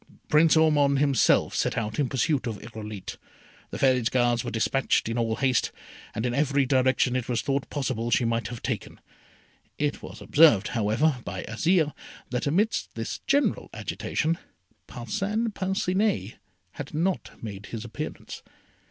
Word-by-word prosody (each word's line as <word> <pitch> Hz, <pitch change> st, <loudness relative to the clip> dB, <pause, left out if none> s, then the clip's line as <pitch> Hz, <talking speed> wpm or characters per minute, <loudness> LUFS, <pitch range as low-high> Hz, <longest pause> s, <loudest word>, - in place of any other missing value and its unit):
Prince 155 Hz, +1 st, +5 dB
Ormond 145 Hz, -3 st, +4 dB
himself 140 Hz, -1 st, +3 dB
set -, -, 0 dB
out 110 Hz, +1 st, -2 dB
in 140 Hz, -4 st, +1 dB
pursuit 135 Hz, 0 st, 0 dB
of 110 Hz, -3 st, -3 dB
Irolite. 110 Hz, -3 st, -8 dB, 0.5 s
The -, -, -6 dB
Fairy's 130 Hz, -3 st, +3 dB
Guards 120 Hz, -2 st, +2 dB
were 120 Hz, -, -3 dB
despatched 120 Hz, +3 st, +1 dB
in 115 Hz, -, -2 dB
all 115 Hz, -2 st, 0 dB
haste, 130 Hz, 0 st, +1 dB, 0.4 s
and 110 Hz, -, -2 dB
in 120 Hz, -, 0 dB
every 140 Hz, 0 st, +2 dB
direction 130 Hz, -1 st, +2 dB
it 125 Hz, -1 st, -2 dB
was 120 Hz, -3 st, 0 dB
thought 140 Hz, 0 st, -1 dB
possible 130 Hz, -5 st, -2 dB
she 120 Hz, -, +2 dB
might 115 Hz, -1 st, 0 dB
have 115 Hz, 0 st, -8 dB
taken. -, -, -4 dB, 0.8 s
It 145 Hz, -1 st, -1 dB
was -, -, -9 dB
observed, 145 Hz, -10 st, +5 dB
however, 120 Hz, +6 st, +1 dB
by 95 Hz, -2 st, -5 dB
Azire, 155 Hz, -, +1 dB, 0.4 s
that 125 Hz, +2 st, -1 dB
amidst 200 Hz, +10 st, 0 dB
this -, -, -4 dB
general 285 Hz, +1 st, +1 dB
agitation, 165 Hz, +1 st, -2 dB, 0.5 s
Parcin 195 Hz, -, -2 dB
Parcinet 190 Hz, -, 0 dB, 0.3 s
had 145 Hz, +6 st, -8 dB
not 180 Hz, +4 st, -1 dB
made 105 Hz, -2 st, -7 dB
his 115 Hz, -1 st, -6 dB
appearance. 120 Hz, -, -7 dB
130 Hz, 150 wpm, -26 LUFS, 115-150 Hz, 0.8 s, Prince